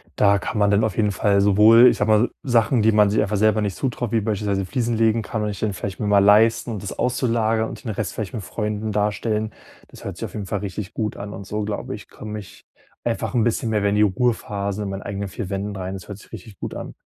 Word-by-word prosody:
da 100 -1 +4
kann - - -4
man 105 -1 +3
dann 100 +2 +3
auf 110 -5 -1
jeden 105 -2 +2
Fall 100 0 +2
sowohl 105 +4 +7
ich - - +4
sage 105 - 0
mal 110 +3 +4
Sachen, 120 -2 +2
die 110 +1 +4
man 105 -1 +4
sich 110 - +2
einfach 105 +1 0
selber 110 +1 +3
nicht 100 -3 -2
zutraut, 120 -4 -2
wie 115 -1 +2
beispielsweise 100 -2 -1
Fliesen 115 +4 -1
legen, 115 0 +3
kann 110 +1 -3
man 105 0 -1
sich 100 - -8
dann 110 -2 -1
vielleicht 95 +1 -5
mal 105 -1 +2
leisten, 110 +4 +4
und 105 -4 -5
das 100 - -6
auszulagern 115 -3 +1
und - - -9
den 115 - -3
Rest 100 -2 -3
vielleicht 105 -4 -5
mit 115 - -4
Freunden 105 0 -3
darstellen. 105 +1 -1 0.4
Das - - -14
hört - - -5
sich - - -4
auf - - -9
jeden 100 -3 -5
Fall 105 - -2
richtig 95 -1 -6
gut 110 -2 -2
an 100 0 -6
und 100 +1 -8
so, 105 +2 -3
glaube 105 0 -4
ich, - - -13
komme 105 0 -7
ich 100 - -14 0.4
einfach - - -2
'n 115 - +3
bisschen 115 0 0
mehr 110 -1 +1
wieder 100 - +2
in 100 - 0
die 105 - +3
Ruhephase 105 -2 -1
in 100 - -4
meinen 95 0 -5
eigenen 100 0 -4
vier 100 0 -6
Wänden 100 +1 -3
rein. 95 0 -4
Das 95 - -10
hört 100 - -7
sich - - -18
richtig 105 -2 -10
gut - - -5
an. - - -7
105 Hz, 265 wpm, -22 LUFS, 100-110 Hz, 0.4 s, sowohl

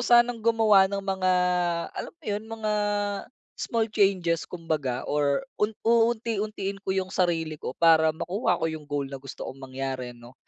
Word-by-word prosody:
sanang 240 0 +5
gumawa 220 -3 +5
ng 200 0 -2
mga 190 -1 +1 0.6
alam - - -6
mo 330 - -26
'yun, 210 +1 -2
mga 220 -1 -3 0.8
small 230 -3 0
changes 190 -6 +2
kumbaga 155 -7 -2
or 145 - +1 0.2
un 210 - +3 0.2
uunti-untiin 220 -4 +1
ko 195 - -3
yung 190 0 0
sarili 165 -4 0
ko - - -4
para 160 -1 +6
makuha 175 +3 -1
ko 160 - 0
yung 160 -1 -4
goal 145 -1 -2
na 135 - -8
gusto 135 -1 -8
kong 135 +1 -10
mangyari 130 -1 -4
ano. 120 +1 -15
185 Hz, 160 wpm, -26 LUFS, 155-215 Hz, 0.8 s, para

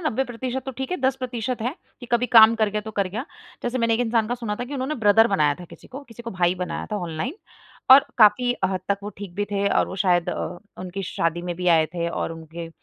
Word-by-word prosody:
90 265 +2 -1
प्रतिशत 255 +1 -4
तो - - -2
ठीक 265 0 -4
है 365 - 0
10 265 0 +1
प्रतिशत 250 -2 -4
है 250 +5 -2 0.3
कि 245 - -9
कभी 240 +1 +3
काम 225 -1 +8
कर 220 -2 +1
गया, 210 +1 -2
तो 220 +1 -8
कर 200 -3 -1
गया। 220 +7 -4 0.4
जैसे 245 +1 -2
मैंने 230 -1 +2
एक 230 - -1
इंसान 225 -2 +1
का 245 - 0
सुना 230 -4 -4
था 245 - -4
कि 275 +4 -7
उन्होंने 270 +3 -2
ब्रदर 225 -2 +5
बनाया 150 -9 +2
था - - -8
किसी - - -14
को, 270 +3 -9
किसी 235 0 -11
को 230 - -6
भाई 180 -2 +1
बनाया 180 0 -4
था - - 0
ऑनलाइन 175 - -4 0.6
और 270 +1 +10
काफ़ी 235 +3 +5
हद 190 -1 0
तक 200 0 +1
वो 205 - -5
ठीक 195 -4 -8
भी 205 +2 -1
थे 200 0 0
और - - +2
वो - - -7
शायद 180 -3 +2
अ, 175 - -4 0.2
उनकी 185 +2 -5
शादी 170 -1 -2
में 175 0 -3
भी 180 +1 -4
आए 160 -2 +5
थे 170 -1 -1
और 165 - -3
उनके 165 +1 -8
215 Hz, 260 wpm, -23 LUFS, 180-245 Hz, 0.6 s, और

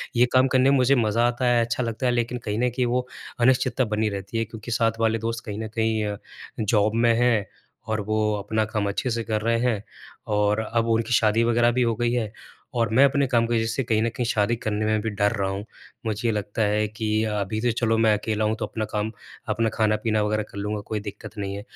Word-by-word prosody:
ये 120 - +5
काम 130 +1 +5
करने 130 +1 +4
में 140 - +4
मुझे 130 +2 +4
मज़ा 115 0 +2
आता 120 +1 -1
है 120 -1 +4
अच्छा 120 +2 -2
लगता 115 +2 -3
है - - +3
लेकिन 120 0 -1
कहीं 105 +1 -2
न 125 - +2
कहीं 125 +1 -1
वो 125 +1 0 0.3
अनिश्चितता 130 0 +3
बनी 110 0 +1
रहती 100 +3 -5
है 115 - 0
क्योंकि 110 +1 -9
साथ 115 -1 +1
वाले 115 0 +2
दोस्त 115 +1 -3
कहीं 105 0 -5
न 110 - -3
कहीं 110 -1 +1
अ, 105 -1 -3 0.4
जॉब 105 0 +2
में 115 0 +4
हैं 120 -5 +3 0.4
और 110 -1 -1
वो 110 0 +1
अपना 110 +2 -1
काम 105 -1 -2
अच्छे 125 +5 -2
से 115 0 -1
कर 110 -1 -1
रहे 115 +1 +1
हैं 115 -4 0 0.5
और 105 +1 +2
अब 115 0 +2
उनकी 115 +1 +1
शादी 110 +1 +3
वग़ैरह 120 0 +3
भी 125 +1 0
हो 115 -2 +1
गई 120 0 0
है 110 -4 -1 0.5
और 115 -2 +2
मैं 130 - +6
अपने 140 0 +2
काम 120 -3 +2
की 120 - -1
वज़ह 115 0 +1
से 125 +4 -1
कहीं 110 -2 +1
न 115 - +1
कहीं 120 +2 -3
शादी 115 +1 +1
करने 110 -2 -2
में 110 -1 +1
भी 110 - -2
डर 105 0 +1
रहा 95 -1 0
हूँ। 100 +1 -4 0.4
मुझे 110 +2 0
लगता 105 +1 -3
है 105 0 +2
कि 110 0 -1
अभी 105 0 -2
तो 120 0 +2
चलो 115 -1 +2
मैं 110 -1 +4
अकेला 110 0 -1
हूँ 110 +1 +1
तो - - -1
अपना 110 -1 -4
काम, 105 +1 -2 0.4
अपना 115 0 +1
खाना-पीना 110 0 +1
वग़ैरह 105 0 0
कर - - -10
लूँगा 105 +1 -3
कोई 110 -1 -2
दिक्कत 105 +1 -9
नहीं 100 -1 -3
है। 100 - -5
110 Hz, 245 wpm, -24 LUFS, 105-120 Hz, 0.5 s, मैं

